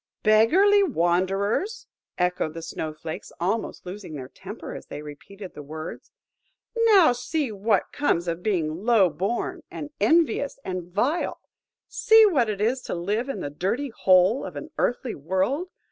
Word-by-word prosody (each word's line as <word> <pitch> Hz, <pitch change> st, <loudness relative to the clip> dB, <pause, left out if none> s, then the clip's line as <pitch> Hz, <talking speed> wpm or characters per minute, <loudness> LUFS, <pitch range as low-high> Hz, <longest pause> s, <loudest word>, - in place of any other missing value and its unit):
"Beggarly 340 Hz, -, +5 dB
wanderers!" 195 Hz, -, 0 dB, 0.3 s
echoed 180 Hz, -3 st, 0 dB
the 165 Hz, -, -6 dB
Snow 155 Hz, -1 st, -4 dB
flakes, 155 Hz, +1 st, -8 dB
almost 195 Hz, +5 st, -2 dB
losing 180 Hz, -3 st, -7 dB
their 130 Hz, -2 st, -7 dB
temper -, -, -9 dB
as -, -, -9 dB
they 150 Hz, -, -7 dB
repeated 185 Hz, +7 st, -10 dB
the -, -, -9 dB
words: 155 Hz, +2 st, -8 dB, 0.6 s
"now 430 Hz, -, +6 dB
see 250 Hz, +2 st, -2 dB
what 210 Hz, +2 st, 0 dB
comes 180 Hz, -12 st, 0 dB
of 170 Hz, +1 st, -2 dB
being 175 Hz, -4 st, -1 dB
low 215 Hz, -7 st, +4 dB
born, 235 Hz, -, -2 dB
and 295 Hz, 0 st, -7 dB
envious, 315 Hz, -4 st, +2 dB
and 180 Hz, -2 st, -5 dB
vile. 255 Hz, -, 0 dB, 0.5 s
See 445 Hz, 0 st, +6 dB
what 270 Hz, -, +2 dB
it 205 Hz, -2 st, -3 dB
is 240 Hz, +5 st, +1 dB
to -, -, -4 dB
live 210 Hz, +9 st, -2 dB
in 210 Hz, -9 st, -4 dB
the 145 Hz, -, -4 dB
dirty 215 Hz, -, -2 dB
hole 190 Hz, +2 st, +3 dB
of -, -, -7 dB
an 315 Hz, -, -7 dB
earthly 245 Hz, -1 st, 0 dB
world! 190 Hz, -, -1 dB
205 Hz, 155 wpm, -25 LUFS, 175-275 Hz, 0.6 s, now